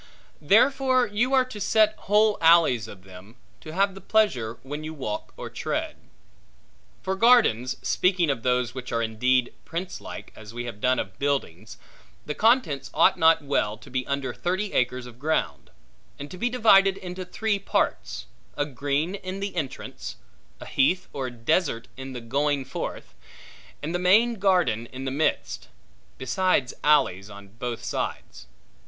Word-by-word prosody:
Therefore 255 - +4
you 240 +5 +1
are 260 -1 +4
to 215 -5 -9
set 215 +1 +3
whole 210 +1 +2
alleys 160 -9 +5
of 95 -4 -12
them, 95 +4 -14 0.2
to 155 - -10
have 195 +3 +1
the 195 - -11
pleasure 130 - +1
when 145 +3 -6
you 155 +1 -6
walk 110 -7 -5
or - - -6
tread. - - -3 1.1
For 190 - -1
gardens 195 - +4
(speaking 180 -4 +2
of 130 -4 -3
those 125 -1 0
which 125 -1 -7
are 115 -1 0
indeed 125 +3 +1
princelike, 180 +3 -7
as 110 +1 -12
we 120 0 -4
have 115 -3 -8
done 130 0 +2
of 95 - -5
buildings), 120 - -2 0.5
the 150 - -3
contents 180 - +2
ought 165 +3 +4
not 160 -1 +5
well 110 -7 0
to 110 - -15
be 130 0 -1
under 140 -2 -2
thirty 190 - -2
acres 125 0 0
of 125 -1 -13
ground; 135 - -1 0.5
and 145 +1 -8
to 185 - -8
be 245 - +1
divided 195 -5 +5
into 180 0 -6
three 205 +3 -1
parts; 190 - -1 0.3
a 145 - +1
green 145 +4 -2
in 190 -1 -6
the 200 -1 -4
entrance; 150 -7 -5 0.4
a - - -9
heath 180 +8 +1
or 135 -2 -3
desert 120 +1 0
in 130 0 -8
the 125 - -6
going 140 +3 0
forth; 135 - -6 0.7
and 160 +3 -3
the 175 - 0
main 215 +5 +4
garden 180 - +2
in 130 +2 -8
the 135 - -2
midst; 145 +4 -1 0.5
besides 140 0 0
alleys 135 -10 +3
on 100 -1 -12
both 115 +2 -6
sides. 60 - -5
145 Hz, 160 wpm, -25 LUFS, 125-190 Hz, 1.1 s, alleys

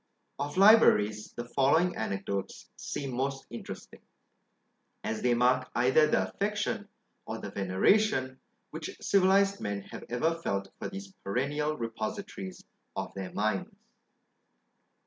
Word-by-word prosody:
Of 145 +3 -3
LIBRARIES, 110 - +5
the 120 - -5
following 140 +8 +3
anecdotes 100 -2 -3
seem 135 -3 -4
most 135 +2 -2
interesting, 115 - -8 1.0
as 110 - -2
they 125 -1 +3
mark 125 +1 +3
either 130 +6 +5
the - - +2
affection, 205 0 -2 0.4
or - - -3
the - - -7
veneration, 130 - +2 0.3
which - - -6
civilised 195 +1 +3
men 100 -1 -2
have - - -7
ever 140 +8 +1
felt 100 -9 -2
for - - -4
these 195 +1 -8
perennial 145 +8 -1
repositories 115 - -5 0.3
of - - -4
their 95 -2 -5
minds. 105 -1 -1
130 Hz, 120 wpm, -30 LUFS, -, 1.0 s, LIBRARIES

